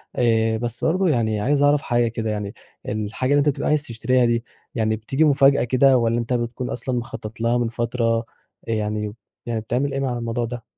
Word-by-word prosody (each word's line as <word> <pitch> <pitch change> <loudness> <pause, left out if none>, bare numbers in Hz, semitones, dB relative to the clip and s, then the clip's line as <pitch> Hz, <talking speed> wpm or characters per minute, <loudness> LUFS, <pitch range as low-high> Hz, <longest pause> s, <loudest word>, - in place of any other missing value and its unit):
آآ، 115 -2 +2
بس 120 +1 -4
برضه 185 +3 +2
يعني 110 -6 +1
عايز 140 +5 +2
أعرف 145 0 +4
حاجة 120 -1 +1
كده 115 -1 -3
يعني، 105 -1 -3 0.4
الحاجة 110 +5 -2
اللي 145 - +5
أنت 145 +1 +3
بتبقى 135 - -2
عايز 150 -1 +2
تشتريها 125 0 +1
دي، 120 0 +1 0.3
يعني 110 -1 +1
بتيجي 135 +8 0
مفاجأة 140 -1 +4
كده 130 +2 +4
والَّا 115 -1 +1
أنت 120 +1 -2
بتكون 120 +1 -2
أصلًا 125 +1 -3
مخطّط 115 -1 -8
لها 115 +1 +2
من 120 -1 0
فترة 115 0 -1 0.4
يعني 105 -1 -2 0.3
يعني 115 -2 -2
بتعمل 130 +5 -1
إيه 135 - -1
مع 130 -3 -1
الموضوع 115 0 -2
ده؟ 120 0 -6
120 Hz, 195 wpm, -22 LUFS, 115-130 Hz, 0.4 s, اللي